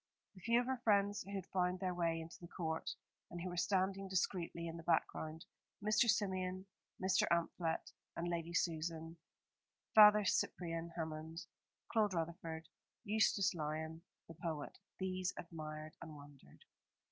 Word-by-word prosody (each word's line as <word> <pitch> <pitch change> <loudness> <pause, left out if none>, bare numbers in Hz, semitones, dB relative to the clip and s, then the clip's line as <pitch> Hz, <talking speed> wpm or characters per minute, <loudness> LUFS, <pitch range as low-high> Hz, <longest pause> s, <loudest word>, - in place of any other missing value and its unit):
The 185 - -14
few 235 +4 +4
of 245 - 0
her 260 -1 -2
friends 205 -2 +3
who 200 +1 -6
had 190 -3 -3
found 180 -1 0
their 185 -1 0
way 165 -2 +1
into 165 0 -8
the 170 - -8
court, 160 -2 -2 0.4
and 175 - -6
who 180 +2 -3
were 175 - -5
standing 190 +2 +1
discreetly 175 -2 -1
in 165 0 -4
the - - -7
background, 160 -1 0 0.3
Mr. 215 +3 +4
Symeon, 185 -2 +1 0.3
Mr. 190 0 +3
Amphlett 170 -1 0 0.2
and 170 - -2
Lady 170 -1 -2
Susan, 165 0 -1 0.8
Father 210 -1 +9
Cyprian 165 -3 0
Hammond, 160 +1 -4 0.5
Claude 210 -4 +3
Rutherford, 165 -1 -3 0.4
Eustace 200 -2 +3
Lyon, 160 0 -3 0.3
the 165 - -9
poet 160 -2 -4 0.2
these 185 -1 -1
admired 155 -2 -6
and 160 -2 -8
wondered. 145 - -15
170 Hz, 145 wpm, -38 LUFS, 160-190 Hz, 0.8 s, Father